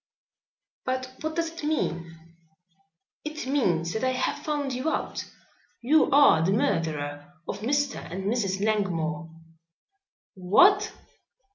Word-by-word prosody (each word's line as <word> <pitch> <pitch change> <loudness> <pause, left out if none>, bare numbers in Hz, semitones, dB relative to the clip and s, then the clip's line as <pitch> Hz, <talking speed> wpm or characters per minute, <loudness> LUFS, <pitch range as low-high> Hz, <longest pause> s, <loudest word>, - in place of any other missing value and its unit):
"But 255 0 -3
what 315 0 -3
does 330 -1 -1
it 330 -1 -10
mean?" 170 - -2 1.1
"It 305 -1 -5
means 175 - +1
that 220 - -3
I 260 0 +2
have 255 - -2
found 290 -3 -2
you 255 +5 -1
out. - - -3 0.6
You 305 +6 +4
are 280 - +6
the 190 +4 +2
murderer 160 - -1
of 200 - -4
Mr. 280 +5 0
and 190 +2 -4
Mrs. 200 -2 0
Langmore." 165 -7 -1 1.0
"What!" 360 - +4
235 Hz, 120 wpm, -26 LUFS, 170-285 Hz, 1.1 s, are